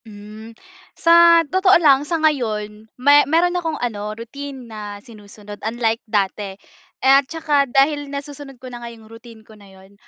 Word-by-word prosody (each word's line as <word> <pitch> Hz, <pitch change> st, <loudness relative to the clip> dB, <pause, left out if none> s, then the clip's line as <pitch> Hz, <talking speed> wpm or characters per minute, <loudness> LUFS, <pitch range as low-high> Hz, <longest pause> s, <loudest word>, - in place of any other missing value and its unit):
Hmm. 215 Hz, +1 st, -13 dB, 0.4 s
Sa 335 Hz, 0 st, +5 dB
totoo 375 Hz, +5 st, +3 dB
lang, 285 Hz, -5 st, +4 dB
sa 335 Hz, -, 0 dB
ngayon 220 Hz, -8 st, -2 dB
me 285 Hz, +3 st, +5 dB
mayro'n 345 Hz, +3 st, +2 dB
akong 330 Hz, -3 st, -3 dB
ano, 210 Hz, -3 st, -5 dB
routine 265 Hz, +3 st, -9 dB
na 210 Hz, -2 st, -8 dB
sinusunod, 205 Hz, -1 st, -14 dB
unlike 225 Hz, +1 st, -2 dB
dati. 200 Hz, -1 st, -2 dB, 0.5 s
At 270 Hz, 0 st, +4 dB
saka 295 Hz, -4 st, 0 dB
dahil 285 Hz, +2 st, +1 dB
nasusunod 280 Hz, -1 st, -9 dB
ko 255 Hz, -, -15 dB
na 240 Hz, -, -9 dB
nga 235 Hz, -, -7 dB
yung 225 Hz, -1 st, -15 dB
routine 225 Hz, -1 st, -15 dB
ko 220 Hz, -, -17 dB
na 205 Hz, -2 st, -17 dB
yun, 190 Hz, +1 st, -19 dB
240 Hz, 160 wpm, -19 LUFS, 215-290 Hz, 0.5 s, Sa